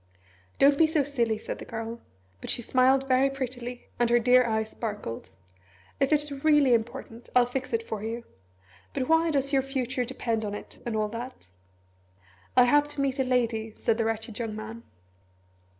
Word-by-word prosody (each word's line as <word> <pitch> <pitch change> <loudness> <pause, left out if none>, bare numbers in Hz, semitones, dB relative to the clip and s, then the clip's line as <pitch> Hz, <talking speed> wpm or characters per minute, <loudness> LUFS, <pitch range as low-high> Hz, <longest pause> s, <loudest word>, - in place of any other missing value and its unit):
"Don't 280 0 +5
be 325 - +6
so 310 -2 +2
silly," 240 -6 0
said - - -6
the - - -7
Girl; 225 +1 -5 0.4
but - - -7
she 240 - +1
smiled 265 +3 +3
very 260 +1 +4
prettily, 250 -2 -5
and 240 -1 +3
her 240 - +5
dear 250 +2 +5
eyes 220 -2 -1
sparkled. 205 - -5 0.7
"If 275 - +2
it's 295 -2 0
really 295 -5 +5
important, 235 0 -3
I'll 250 -1 +6
fix 255 +1 -4
it 230 -1 0
for 215 -2 -4
you! 230 +2 -4 0.7
But 260 -2 -1
why 325 +1 +4
does 275 -2 +1
your 270 - +4
future 260 -2 -2
depend 230 -2 -2
on 205 -1 -3
it, - - -9
and 230 - -2
all 215 -1 0
that?" 235 - -8 1.1
"I 250 - +9
have 290 +4 +4
to 295 -1 -4
meet 275 0 0
a - - +4
lady," 230 -4 0
said 230 0 0
the 225 - +2
wretched 225 0 -3
young 225 -2 -3
man. 220 +2 -7
245 Hz, 180 wpm, -27 LUFS, 225-270 Hz, 1.1 s, I